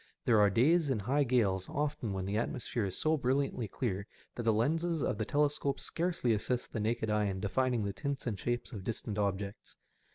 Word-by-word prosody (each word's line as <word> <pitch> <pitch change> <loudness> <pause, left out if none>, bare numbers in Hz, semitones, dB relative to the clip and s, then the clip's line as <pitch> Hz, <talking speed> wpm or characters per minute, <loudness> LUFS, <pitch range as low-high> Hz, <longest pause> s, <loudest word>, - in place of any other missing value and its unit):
There 115 -3 +5
are 105 -1 +6
days 145 - +3
in 130 - +1
high 130 +8 +1
gales 105 -8 +1
often 145 -7 -2
when 95 -1 -2
the 100 +2 -2
atmosphere 115 0 -1
is 95 -1 -3
so 155 0 +2
brilliantly 130 -3 0
clear 100 -2 -3 0.3
that - - -4
the 115 -1 +3
lenses 160 +8 +1
of 105 - -1
the 110 - 0
telescope 145 0 +1
scarcely 165 -9 0
assist 120 +3 -2
the - - -1
naked 110 0 0
eye 105 0 +2
in 95 -1 -2
defining 120 +4 +1
the 100 -1 -2
tints 140 +9 -3
and 110 -6 -2
shapes 120 +4 -2
of 100 -4 -6
distant 105 0 -3
objects. 100 0 -3
115 Hz, 200 wpm, -32 LUFS, 100-140 Hz, 0.3 s, are